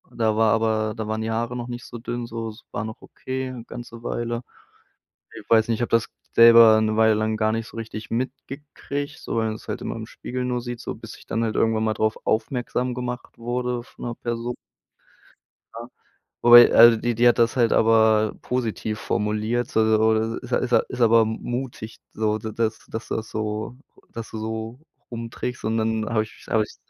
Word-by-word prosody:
da 110 -2 +1
war, 110 0 +4
aber 110 -1 +1
da 110 -2 -5
waren 110 0 -2
die 110 - -3
Haare 115 +2 -2
noch 120 0 -5
nicht 120 0 -7
so 120 - -9
dünn 120 0 -4
so, 115 -1 -5
es 110 +2 -13
war 105 - -3
noch 110 0 -8
okay, 130 0 -5
'ne 120 -3 -8
ganze 115 -1 -9
Weile. 120 0 -3 0.9
Ich - - -12
weiß 115 0 +4
nicht, 115 - +1
ich - - -5
habe 120 - -1
das 115 -1 +3 0.3
selber 115 -1 +8
'ne 110 0 0
Weile 110 -1 +5
lang 110 0 0
gar 110 0 +1
nicht 115 0 -3
so - - -12
richtig 110 -1 -7
mitgekriegt, 140 +3 -5
so - - -4
weil 110 - +1
man 110 -1 -2
es - - -13
halt - - -3
immer - - -4
im - - -6
Spiegel 125 0 -5
nur 125 -1 -1
sieht, 120 -1 -6
so - - -5
bis - - -10
ich - - -17
dann 115 - -2
halt 110 - -3
irgendwann 110 -1 +2
mal 110 - +1
drauf 110 0 0
aufmerksam 125 +2 -1
gemacht 125 0 -6
wurde 120 0 -2
von - - -14
'ner 120 -1 -4
Perso 120 +1 -4 1.2
ja, 120 +1 -7 0.5
wobei, 120 0 +9
also, 115 0 +8
die 120 +1 -1
die 120 +1 +4
hat 120 - +4
das 115 +1 +3
halt 120 -3 +3
aber 110 -1 +4
positiv 110 -3 -3
formuliert, 110 +3 -1
so 110 - +2
so 110 +1 +2
ist 125 0 -11 0.2
ja - - +6
ist 125 - -6
ja 120 - +6
aber 115 0 +5
m 110 0 -3
mutig, 120 -3 -5 0.2
so 110 0 0
da 110 0 -6
dass 110 0 -1
dass 110 +1 -6
dass 110 0 -3
so 110 +3 -4 0.3
dass 115 -1 -7
du 110 - -6
so 110 +2 -5 0.3
rumtrickst 115 +1 -5
und 110 +1 0
dann 110 -1 -1
habe 110 -2 +1
ich 110 - -15
habe 110 -1 +3
ich - - -11
115 Hz, 210 wpm, -23 LUFS, 110-120 Hz, 1.2 s, wobei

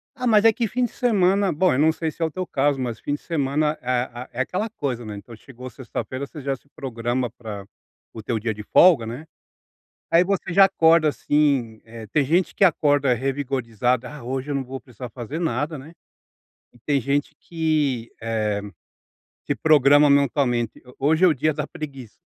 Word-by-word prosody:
Ah, 250 -1 -3
mas 215 -2 +5
é 225 - +7
que 230 +1 -2
fim 250 +5 -1
de - - -6
semana 200 -4 +2
bom 180 +2 +2
eu 130 - 0
não 160 +2 +5
sei 160 0 -3
se 165 - -15
é - - +3
o 160 - -3
teu 185 +2 -4
caso, 140 -2 0
mas 120 -3 -3
fim 145 - -3
de 145 - -4
semana 150 -1 -1
é 125 - -15
a 125 0 -2
é 130 - -1
aquela 205 +10 -2
coisa, 125 - -4
né, 105 - -6
então 110 +3 -11
chegou 125 +1 -11
sexta-feira, 130 +1 -6
você 150 -1 -10
já 135 0 -2
se 140 - -23
programa 120 -2 -2
para 110 -4 -8 0.5
o 110 - -8
teu 110 +1 -2
dia 110 0 -2
de 105 - -9
folga, 155 - +5
né, 125 +8 -7 0.9
aí 170 +2 +5
você 195 -3 -2
já 195 +2 +7
acorda 165 -4 +4
assim, 140 -7 0
eh, 115 -1 -10
tem 140 +6 +1
gente 170 +6 +1
que - - +4
acorda 145 -6 +3
revigorada, 130 -2 -1
"ah, 145 -5 -10
hoje 130 +3 -4
eu - - -1
não 135 -1 -1
vou 130 +1 -7
precisar 125 -1 -10
fazer 125 +8 -6
nada, 150 -1 -2
né", 150 +5 -12 0.8
e 120 - -21
tem 140 +1 0
gente 140 +4 -1
que, 150 -8 -1
eh, 115 0 -2 1.1
se - - -1
programa 145 -1 +5
mentalmente, 135 -4 +1
"ho 125 - -15
hoje 155 +5 +3
é - - +8
o 155 - +2
dia 155 +3 +1
da 150 0 -4
preguiça". 135 -7 -9
140 Hz, 200 wpm, -23 LUFS, 125-160 Hz, 1.1 s, é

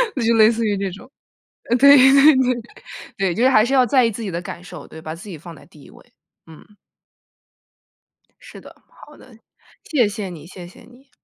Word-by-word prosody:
那 255 - -3
就 230 - +2
类 220 0 +5
似 230 0 -3
于 205 -2 -1
这 195 -1 -3
种。 200 +7 -14 0.7
对， 280 +1 +7
对， 275 +3 +5
对。 250 -2 0 0.6
对， 190 -3 -2
就 235 - -1
是 260 - +4
还 215 -3 +3
是 265 - -3
要 255 -2 +3
在 255 +1 +2
意 230 - -1
自 230 - -9
己 195 - -5
的 170 +1 -5
感 175 0 -10
受， 180 - -12
对， 160 - -13
把 155 0 -8
自 195 +5 -13
己 170 - -9
放 170 +1 -13
在 - - -18
第 - - -20
1 - - -17
位。 - - -21 0.3
嗯。 185 +6 -18 1.6
是 - - -14
的， - - -17
好 295 - -18
的。 245 -4 -19 0.5
谢 255 -9 0
谢 205 -2 -6
你， 165 -2 -12
谢 180 -1 -12
谢 180 - -18
你。 255 +3 -21
220 Hz, 225 characters per minute, -19 LUFS, 185-255 Hz, 1.6 s, 对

